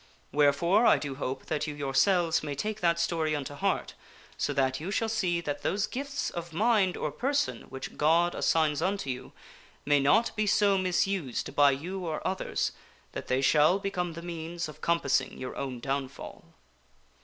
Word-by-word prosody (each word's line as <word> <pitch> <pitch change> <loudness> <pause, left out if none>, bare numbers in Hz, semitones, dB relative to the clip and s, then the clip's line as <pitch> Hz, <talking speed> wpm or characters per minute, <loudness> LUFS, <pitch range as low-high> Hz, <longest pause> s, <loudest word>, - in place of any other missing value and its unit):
Wherefore 160 - +4
I - - +6
do 145 -2 -4
hope 130 -1 -4
that 150 0 -2
you 150 - -4
yourselves 160 +5 +2
may 145 -2 -4
take 215 +8 -3
that 170 -1 +2
story 160 -2 0
unto 145 -1 -4
heart 145 - -1 0.4
so - - -1
that 130 -1 +1
you 165 +5 -5
shall 225 +2 0
see 180 -6 0
that 145 -3 -4
those 200 +2 0
gifts 280 +2 -4
of 170 -1 -6
mind 205 -1 +2
or 150 - -2
152 - - -20
FOREWORD 260 - +1
person 285 0 -1
which 135 - -7
God 170 +3 +3
assigns 155 -3 +1
unto 190 -8 -1
you 125 0 -7 0.5
may 145 0 +4
not 210 +12 +3
be 215 -1 0
so 200 0 +4
misused 185 -6 -1
by 145 -1 +6
you 175 +8 -3
or 160 -3 -4
others 185 0 -1 0.4
that - - -6
they 130 +1 +1
shall 150 +6 +4
become 180 -3 -3
the 170 +1 -8
means 170 0 -5
of 155 - -12
compassing 170 -5 +1
your 130 - -6
own 130 -3 -4
downfall. 135 +1 -5
165 Hz, 180 wpm, -29 LUFS, 145-190 Hz, 0.5 s, I